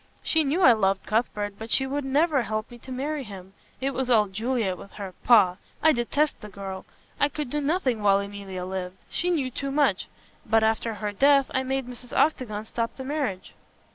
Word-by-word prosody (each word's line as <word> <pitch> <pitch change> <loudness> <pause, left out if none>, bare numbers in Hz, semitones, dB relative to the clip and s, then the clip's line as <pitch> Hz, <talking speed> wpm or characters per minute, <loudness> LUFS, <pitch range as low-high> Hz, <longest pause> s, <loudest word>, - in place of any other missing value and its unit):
She 320 -1 +3
knew 310 +6 +1
I 250 - +9
loved 195 -3 +1
Cuthbert, 210 -2 -1
but 220 +1 -7
she 265 - +3
would 280 +2 -2
never 285 +1 +2
help 215 0 -3
me 240 - -11
to 260 - -11
marry 280 +3 -2
him. 195 -4 -10 0.3
It 270 +1 -1
was 260 -1 -2
all 215 -4 +5
Juliet 220 -1 -1
with 195 - -13
her 195 -3 -7
pah! 200 -7 +5 0.3
I 315 - +7
detest 285 +4 0
the 210 - -9
girl. 195 -1 -7 0.3
I 285 - +3
could 290 -3 -5
do 295 - -1
nothing 280 - 0
while 200 -1 +4
Emilia 200 -2 -6
lived. 185 0 -5
She 355 - 0
knew 285 -7 0
too 275 +3 -3
much. 290 +1 +1 0.4
But 225 0 +3
after 220 0 +1
her 210 0 -3
death 275 +5 +4
I 260 - +2
made 265 0 -2
Mrs. 245 0 -8
Octagon 220 -8 +1
stop 230 +1 -3
the 265 - -5
marriage." 265 -9 -3
240 Hz, 200 wpm, -26 LUFS, 205-275 Hz, 0.4 s, I